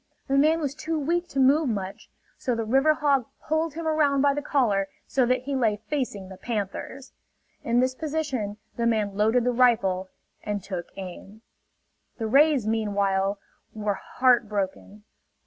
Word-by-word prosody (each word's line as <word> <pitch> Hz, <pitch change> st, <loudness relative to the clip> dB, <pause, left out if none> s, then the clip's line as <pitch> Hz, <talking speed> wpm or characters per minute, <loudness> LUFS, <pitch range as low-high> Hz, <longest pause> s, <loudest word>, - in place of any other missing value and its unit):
The 270 Hz, -, +1 dB
man 310 Hz, +4 st, +4 dB
was 285 Hz, -4 st, -2 dB
too 320 Hz, +2 st, -3 dB
weak 340 Hz, +4 st, 0 dB
to 275 Hz, -, -3 dB
move 275 Hz, +2 st, +4 dB
much; 195 Hz, -3 st, -5 dB, 0.3 s
so 250 Hz, -, -2 dB
the 230 Hz, -1 st, -2 dB
river 270 Hz, +7 st, +3 dB
hog 280 Hz, -5 st, +1 dB, 0.2 s
pulled 315 Hz, 0 st, 0 dB
him 330 Hz, -1 st, -4 dB
around 290 Hz, -3 st, +2 dB
by 285 Hz, -1 st, +4 dB
the 290 Hz, -, -2 dB
collar 225 Hz, -10 st, +1 dB, 0.2 s
so 255 Hz, -3 st, +1 dB
that 255 Hz, +1 st, +1 dB
he 280 Hz, +1 st, -3 dB
lay 225 Hz, -5 st, +2 dB
facing 220 Hz, -5 st, -4 dB
the 190 Hz, 0 st, -10 dB
panthers. 230 Hz, +5 st, -5 dB, 0.5 s
In 235 Hz, +1 st, +2 dB
this 255 Hz, 0 st, +1 dB
position 270 Hz, -8 st, -3 dB, 0.2 s
the 235 Hz, 0 st, +1 dB
man 210 Hz, -3 st, 0 dB
loaded 220 Hz, +4 st, +3 dB
the 250 Hz, -, +2 dB
rifle 215 Hz, -7 st, +2 dB, 0.3 s
and 205 Hz, -2 st, -3 dB
took 180 Hz, -4 st, -5 dB
aim. 195 Hz, +3 st, -9 dB, 0.7 s
The 225 Hz, -, -3 dB
rays, 275 Hz, +1 st, +4 dB
meanwhile, 200 Hz, -3 st, 0 dB, 0.4 s
were 210 Hz, -1 st, -1 dB, 0.2 s
heart 245 Hz, -4 st, +4 dB
broken. 200 Hz, 0 st, -4 dB
245 Hz, 165 wpm, -26 LUFS, 205-280 Hz, 0.7 s, man